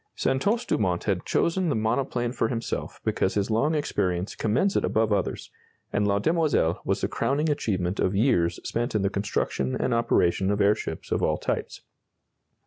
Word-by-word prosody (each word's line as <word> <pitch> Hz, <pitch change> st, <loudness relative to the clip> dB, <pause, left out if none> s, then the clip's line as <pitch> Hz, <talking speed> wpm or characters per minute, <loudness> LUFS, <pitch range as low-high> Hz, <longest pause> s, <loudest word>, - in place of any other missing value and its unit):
Santos 205 Hz, -, 0 dB
Dumont 90 Hz, -4 st, 0 dB
has 100 Hz, -4 st, 0 dB
chosen 175 Hz, +1 st, +1 dB
the 145 Hz, -, +1 dB
monoplane 120 Hz, +2 st, 0 dB
for 120 Hz, -, 0 dB
himself 115 Hz, 0 st, -4 dB
because 95 Hz, -, 0 dB
his 100 Hz, +1 st, 0 dB
long 140 Hz, +9 st, +2 dB
experience 90 Hz, -10 st, -1 dB
commends 130 Hz, -, +1 dB
it -, -, +2 dB
above 110 Hz, -1 st, +1 dB
others, 100 Hz, -2 st, -2 dB, 0.4 s
and 105 Hz, 0 st, +2 dB
La 100 Hz, 0 st, +2 dB
Demoiselle 145 Hz, -, +1 dB
was -, -, -1 dB
the -, -, +1 dB
crowning 150 Hz, +3 st, 0 dB
achievement 95 Hz, -9 st, -1 dB
of 95 Hz, -, +1 dB
years 95 Hz, -7 st, +2 dB
spent 120 Hz, -1 st, -2 dB
in 105 Hz, -, +1 dB
the 100 Hz, -, +1 dB
construction 95 Hz, -10 st, -1 dB
and -, -, 0 dB
operation 95 Hz, -5 st, +2 dB
of 100 Hz, 0 st, 0 dB
airships 100 Hz, -5 st, 0 dB
of -, -, +1 dB
all -, -, +1 dB
types. -, -, -3 dB
110 Hz, 170 wpm, -26 LUFS, 95-135 Hz, 0.4 s, long